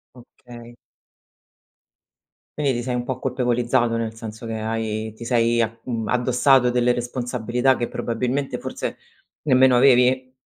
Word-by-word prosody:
Okay. 120 -1 -14 1.8
Quindi, 140 -2 +1
ti 120 -1 -3
sei 125 -1 -2
un 120 - -2
po' 130 0 -4
colpevolizzato, 120 -2 0
nel 115 -1 -3
senso 110 0 -8
che 110 -1 -4
hai 110 0 -3
ti 115 +2 -10
sei 115 -1 +2
a 115 +1 -2
mhmm, 115 -3 -3
addossato 125 +1 +3
delle 125 0 +2
responsabilità 125 +1 -1
che 120 - -3
probabilmente 125 +4 -2
forse - - -5 0.5
nemmeno 130 -3 +4
avevi? 130 0 +4
120 Hz, 130 wpm, -22 LUFS, 115-125 Hz, 1.8 s, nemmeno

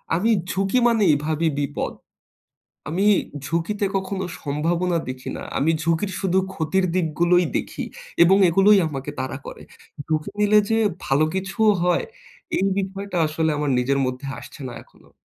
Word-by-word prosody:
আমি 220 +7 +2 0.2
ঝুঁকি 195 +6 +1
মানেই 210 -9 +4
ভাবি 160 +1 0
বিপদ। 140 -2 -2 1.0
আমি 185 +6 0 0.4
ঝুঁকিতে 170 +7 -1
কখনো 190 0 -3 0.2
সম্ভাবনা 170 +4 0
দেখি 130 0 -6
না। - - -7
আমি 155 +4 +2
ঝুঁকির 165 +4 0
শুধু 190 -1 +1 0.2
ক্ষতির 185 +3 0
দিকগুলোই 175 +1 +2
দেখি - - -4 0.4
এবং 190 +3 +5
এগুলোই 195 +4 +5
আমাকে 140 -1 -5
তারা 130 0 -3
করে। - - -9 0.4
ঝুঁকি 155 +4 -1
নিলে 210 0 +5
যে 225 - +2 0.3
ভালো 140 +3 +3
কিছুও 195 +3 +2
হয়, 180 -1 +2 0.5
এই 190 - +1
বিষয়টা 195 -1 -3
আসলে 160 +1 0
আমার 145 -1 0
নিজের 135 +2 +1
মধ্যে 130 +2 -4
আসছে - - -12
না 120 - -8
এখনো। - - -24
175 Hz, 145 wpm, -23 LUFS, 155-195 Hz, 1.0 s, এবং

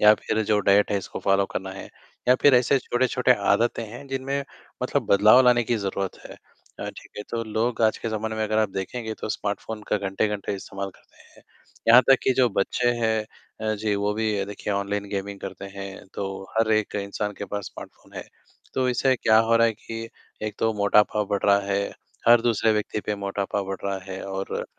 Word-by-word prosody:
या 105 0 +8
फिर 110 - -1
जो 105 0 +2
डाइट 100 +1 +5
है, 100 - +2
उसको 95 - -7
फ़ॉलो 100 0 +3
करना 95 0 -5
है, 95 - -9 0.4
या 125 - +7
फिर 145 -2 +7
ऐसे 125 +2 +4
छोटे-छोटे 125 0 +2 0.2
आदतें 115 +2 +1
हैं, 120 +6 -10
जिनमें 135 +1 -2 0.4
मतलब - - 0
बदलाव 105 +5 +7
लाने 120 -1 +5
की 115 +1 0
ज़रूरत 100 -2 -3
है - - -11 0.5
अ, - - -4
ठीक - - -14
है? 105 - -4
तो 115 -1 -2
लोग 115 +2 -1
आज 110 -1 +3
के 115 - -3
ज़माने 110 0 -3
में, 110 - -1
अगर 110 +1 0
आप 110 - +2
देखेंगे, 110 +4 -4
तो - - -6
स्मार्टफ़ोन 105 +1 -4
का - - +2
घंटे-घंटे 100 +1 -2
इस्तेमाल 100 0 -6
करते - - -23
हैं, - - -20 0.5
यहाँ 125 +2 +9
तक 135 - +8
कि 130 - +3
जो 125 - +5
बच्चे 120 +4 +1
हैं 110 -1 +1 0.4
अ, 110 0 0
जी 105 0 -1
वो 100 +1 0
भी 105 -2 0
देखिए, 105 0 -5
ऑनलाइन 100 +1 -2
गेमिंग 100 0 -4
करते 95 0 -7
हैं, 100 -1 -8
तो - - -3 0.3
हर 115 -1 +3
एक 110 -1 0
इंसान 105 +1 -3
के - - -4
पास 100 0 -5
स्मार्टफ़ोन - - -12
है, - - -5 0.5
तो 130 -1 +1
इससे 130 +2 +2
क्या 110 -2 +4
हो 115 +1 +4
रहा 115 - +5
है 115 - +1
कि 115 +1 -7 0.4
एक 105 - -4
तो 115 0 +1
मोटापा 105 +1 +3
बढ़ 100 - -2
रहा 100 0 +5
है, 100 - +1 0.5
हर 120 0 +8
दूसरे 115 -1 +2
व्यक्ति 105 0 -2
पे 105 - 0
मोटापा 100 0 -2
बढ़ 95 0 -4
रहा 100 -1 -1
है 95 0 -5
और 95 0 -4
105 Hz, 210 wpm, -25 LUFS, 100-115 Hz, 0.5 s, यहाँ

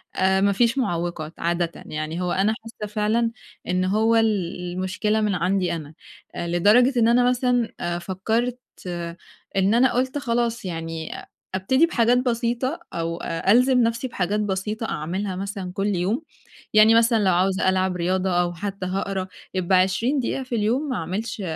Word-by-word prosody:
آآ، 190 0 +2
ما 200 +1 +4
فيش 235 +5 +2
معوّقات 170 - -2
عادةً 170 0 0
يعني 155 +3 -4
هو 180 -1 -1
أنا 195 +4 +2
حاسة 215 -2 -8
فعلًا 225 +2 +1 0.4
إن 185 0 +1
هو 220 +4 +2
ال 210 -5 +1 0.2
المشكلة 200 +4 0
من 210 -2 +1
عندي 180 +1 0
أنا، 155 -2 -8 0.4
آآ، 170 - -3
لدرجة 210 +10 +4
إن 225 - +4
أنا 245 +1 +4
مثلًا 250 -2 +1
آآ، 175 0 -2
فكّرت، 220 +7 -1 1.0
إن 195 +2 +3
أنا 245 +2 +4
قُلت 260 +3 0
خلاص 235 -4 -1
يعني 165 -2 -5
أ - - -13 0.3
أبتدي 260 - +3
بحاجات 245 -7 +2
بسيطة، 245 +3 -1
أو 165 0 -3
ألزم 245 +9 +3
نَفْسي 230 +3 0
بحاجات 205 -3 -1
بسيطة 210 +2 -2
أعملها 185 +5 -3
مثلًا 195 -1 -5
كُلّ 200 +1 -1
يوم، 195 - -1 0.5
يعني 215 +1 +7
مثلًا 230 -1 +4
لو 190 - +4
عاوزة 190 +1 +2
ألعب 185 0 +1
رياضة 185 +2 0
أو 175 0 -1
حتى 195 +2 -5
هاقرا، 190 0 -2 0.3
يبقى 185 0 +2
20 210 +10 +1
دقيقة 265 +1 -2
في 255 -2 -4
اليوم 235 +7 0
ما 255 - -1
أعملش، 210 +2 -4
200 Hz, 160 wpm, -23 LUFS, 185-235 Hz, 1.0 s, يعني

